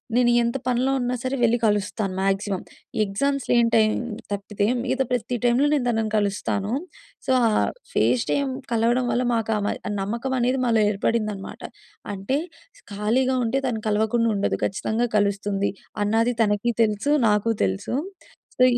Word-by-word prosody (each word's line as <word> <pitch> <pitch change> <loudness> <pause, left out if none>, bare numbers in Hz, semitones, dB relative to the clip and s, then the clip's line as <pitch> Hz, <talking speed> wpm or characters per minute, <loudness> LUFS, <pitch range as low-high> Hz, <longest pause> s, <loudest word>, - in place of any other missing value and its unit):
నేను 245 -1 +4
ఎంత 235 +2 0
పనిలో 250 +2 +1
ఉన్నా 245 0 -1
సరే 260 +1 -1
వెళ్ళి 235 0 +4
కలుస్తాను. 205 -1 0
మాక్సిమం. 195 0 0 0.4
ఎగ్జామ్స్ 275 +7 -1
లేని 235 -1 +4
టైమ్‌లో 215 +1 +3 0.3
తప్పితే 200 0 -2 0.2
మిగతా 265 +1 0
ప్రతి 245 0 -1
టైమ్‌ 240 +1 +3
నేను 280 -5 +1
తనని 220 -2 0
కలుస్తాను. 205 0 -1 0.6
సో, - - +2 0.2
ఆ - - +3 0.4
ఫేస్ 245 - +2
టైమ్ 280 -2 0 0.2
కలవడం 235 +2 +2
వల్ల 245 +2 +1
మాకా 225 -1 0
మ - - +1 0.3
నమ్మకం 235 +7 -2
అనేది 250 +2 +1
మాలో 230 -2 +3
ఏర్పడిందనమాట. 210 -1 -2 0.5
అంటే 200 +8 -1 0.6
ఖాళీగా 250 +6 +1
ఉంటే 260 +4 +1
తను 225 -3 -2
కలవకుండా 220 +2 +2
ఉండదు 200 - 0
ఖచ్చితంగా 220 +4 -1
కలుస్తుంది. 200 -1 0 0.3
అన్నది 225 +4 +2
తనకి 210 +2 +1
తెలుసు. 215 +6 0 0.2
నాకు 210 +2 +2
తెలుసు. 95 - -2 0.6
సో, 255 - +5
225 Hz, 140 wpm, -24 LUFS, 205-245 Hz, 0.6 s, సో